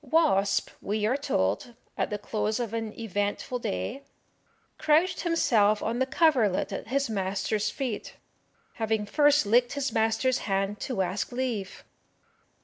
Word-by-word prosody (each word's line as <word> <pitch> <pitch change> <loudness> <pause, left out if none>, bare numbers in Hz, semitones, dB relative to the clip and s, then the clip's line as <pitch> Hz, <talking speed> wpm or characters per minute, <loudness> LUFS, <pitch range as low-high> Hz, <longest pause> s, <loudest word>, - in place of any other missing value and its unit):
"Wasp," 290 -12 +2
we 210 +1 -1
are 235 +5 +2
told, 165 - -1 0.2
at - - -1
the 210 - -2
close 215 +2 -2
of 230 -3 -3
an 225 -1 -3
eventful 205 +4 -2
day, 95 - -3 0.8
"crouched 315 +4 +3
himself 220 - +2
on 230 +2 -1
the 260 - +1
coverlet 255 - +2
at 195 - -5
his 275 +3 0
master's 200 +1 -1
feet, 240 -1 -4 0.7
having 220 -1 0
first 290 +4 +4
licked 245 +4 +3
his 280 -2 -1
master's 225 +4 +1
hand 195 0 -1
to 235 -8 -1
ask 185 +2 -3
leave." 240 -6 -3
225 Hz, 140 wpm, -27 LUFS, 205-260 Hz, 0.8 s, first